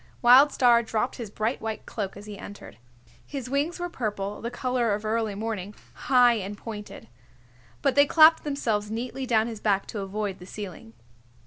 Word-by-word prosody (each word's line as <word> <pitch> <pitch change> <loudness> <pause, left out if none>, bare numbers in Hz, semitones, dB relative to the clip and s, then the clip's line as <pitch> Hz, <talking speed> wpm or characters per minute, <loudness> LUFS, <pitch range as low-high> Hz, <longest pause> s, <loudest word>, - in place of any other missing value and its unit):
Wild 260 +5 +8
Star 240 -3 +4
dropped 225 +2 -2
his 230 -5 -6
bright 220 +4 -2
white 220 -1 -5
cloak 200 -3 -5
as 205 - -10
he 210 -1 -8
entered. 200 - -11 0.4
His 265 -3 -7
wings 295 +6 -1
were 350 - -2
purple, 210 - -4
the 235 - -3
color 245 -3 0
of 210 +1 -7
early 220 -1 -1
morning, 210 -2 -4 0.3
high 245 -3 +5
and 200 +1 -6
pointed. 210 -1 -9 0.8
But 275 - +3
they 285 0 +5
clapped 320 +1 +6
themselves 225 -8 -1
neatly 250 +4 -4
down 220 -3 +3
his 225 -2 -6
back 200 -2 +1
to 215 - -5
avoid 200 0 -4
the 180 - -12
ceiling. 185 - -8
225 Hz, 180 wpm, -26 LUFS, 205-250 Hz, 0.8 s, Wild